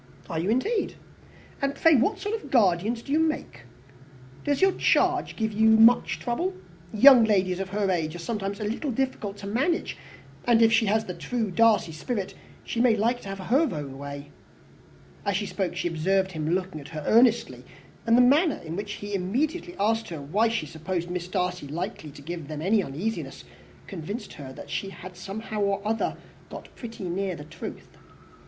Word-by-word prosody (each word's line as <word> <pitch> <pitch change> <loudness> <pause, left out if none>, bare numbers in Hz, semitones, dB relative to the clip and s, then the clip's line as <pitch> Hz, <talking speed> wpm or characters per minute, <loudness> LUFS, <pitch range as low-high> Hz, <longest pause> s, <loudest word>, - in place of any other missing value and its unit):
"Are 160 - -1
you, 175 +5 -1
indeed? 405 - 0 0.7
And 275 0 0
pray 325 +3 +5
what 295 - +3
sort 410 +2 -4
of 450 - -4
a - - -9
guardian 210 -4 +3
do 235 +4 -9
you 305 - +3
make? 305 - -2 0.8
Does 285 -1 0
your 385 0 +5
charge - - +2
give 220 -1 -1
you 220 +2 +4
much 225 +2 +5
trouble? 350 +11 -2 0.4
Young 250 +2 +8
ladies 190 -4 +2
of 195 -1 -3
her 200 0 0
age 160 -2 -1
are - - -5
sometimes 200 +2 -4
a - - -3
little 230 +8 -2
difficult 235 -5 -2
to 200 - -9
manage; 270 - 0 0.5
and 230 -1 +5
if 225 0 +5
she 225 -1 +4
has 220 +2 +2
the 180 - -5
true 205 +6 -3
Darcy 220 -3 +3
spirit, 190 +6 -4 0.3
she 235 - -2
may 240 -3 +5
like 235 +4 +1
to 195 - -8
have 195 - -5
her 255 - +2
own 140 -4 -6
way." 140 0 -7 0.9
As 200 -2 0
she 205 - -2
spoke, 190 -2 -3
she - - -1
observed 190 +4 +1
him 155 -2 -3
looking 180 -3 -1
at 140 - -11
her 155 -2 -6
earnestly; 235 +1 +3 0.4
and 230 +1 +5
the - - +7
manner 290 +6 +4
in 160 +1 -5
which 205 +2 -4
he 205 0 -7
immediately 295 - -1
asked 225 +2 +1
her 165 -3 -5
why 190 +11 +1
she 225 -8 -1
supposed 170 +3 -4
Miss 180 -1 -3
Darcy 180 -4 -2
likely 165 +1 -5
to 145 0 -13
give 165 -1 -6
them 155 0 -5
any 205 +3 +3
uneasiness, 190 +9 -4 0.4
convinced 200 +5 -6
her 135 -3 -9
that - - -10
she 195 - -2
had 185 -1 -10
somehow 210 +3 -5
or 200 0 +1
other 225 +1 -1 0.3
got - - -10
pretty 230 -4 -8
near 185 +1 -2
the 150 - -9
truth. 155 - -9
205 Hz, 190 wpm, -26 LUFS, 175-235 Hz, 0.9 s, Young